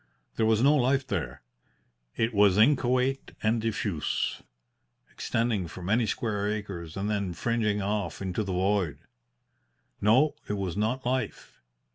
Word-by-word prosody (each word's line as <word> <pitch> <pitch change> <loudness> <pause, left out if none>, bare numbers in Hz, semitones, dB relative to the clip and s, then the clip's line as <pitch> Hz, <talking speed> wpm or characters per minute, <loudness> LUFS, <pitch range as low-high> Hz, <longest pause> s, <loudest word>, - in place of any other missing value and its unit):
There 110 - +2
was 110 +1 +3
no 145 +2 +6
life 135 -1 +2
there. 80 - -4 0.7
It 115 +1 +1
was 100 -2 +5
inchoate 130 +2 +2
and 110 +1 +2
diffuse, 105 -7 -2 0.7
extending 115 -6 -1
for 90 +4 -9
many 110 +5 +2
square 105 -3 -1
acres 95 -6 -5
and 100 +1 -2
then 100 -4 -1
fringing 105 -3 0
off 105 0 -2
into 95 +2 -2
the 100 - -4
void. 90 -5 0 1.0
No, 130 +9 +4 0.2
it - - 0
was 95 -3 -3
not 115 +5 -1
life. 130 +1 -3
105 Hz, 135 wpm, -28 LUFS, 95-120 Hz, 1.0 s, no